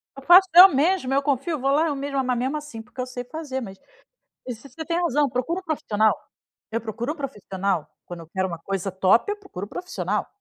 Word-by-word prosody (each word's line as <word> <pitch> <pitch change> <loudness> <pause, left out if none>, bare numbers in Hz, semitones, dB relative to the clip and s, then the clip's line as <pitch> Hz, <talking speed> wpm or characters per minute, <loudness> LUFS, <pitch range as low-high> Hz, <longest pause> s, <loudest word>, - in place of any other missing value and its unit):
Eu 275 - -11
faço 365 +4 +8
eu 365 +2 +12
mesma. 290 -2 +1
Eu 280 - +2
confio. 290 +3 -1
Vou 270 +2 +1
lá 310 +3 +3
eu 290 - -1
mesma. 275 -1 -2
Mas 250 -1 0
mesmo, 265 +5 -1
assim, 290 -7 -8
porque 245 +2 -17
eu 255 - -2
sei 250 -1 -6
fazer. 265 -1 -5
Mas 195 -4 -8 0.7
isso 245 +2 -7
você 320 +5 -8
tem 335 +2 -1
razão: 295 -4 +2
"Procura 255 +10 -2
o - - -23
profissional". 220 - +1 0.6
Eu 230 - -1
procuro 230 +5 -4
um 330 - -11
profissional. 195 - -3 0.2
Quando 175 -1 -8
eu 165 - -12
quero 190 +2 -1
uma 170 -2 -6
coisa 195 +2 -3
top, 190 - +3
eu - - -5
procuro 205 - -8
profissional. 360 - -3
265 Hz, 220 wpm, -24 LUFS, 220-305 Hz, 0.7 s, eu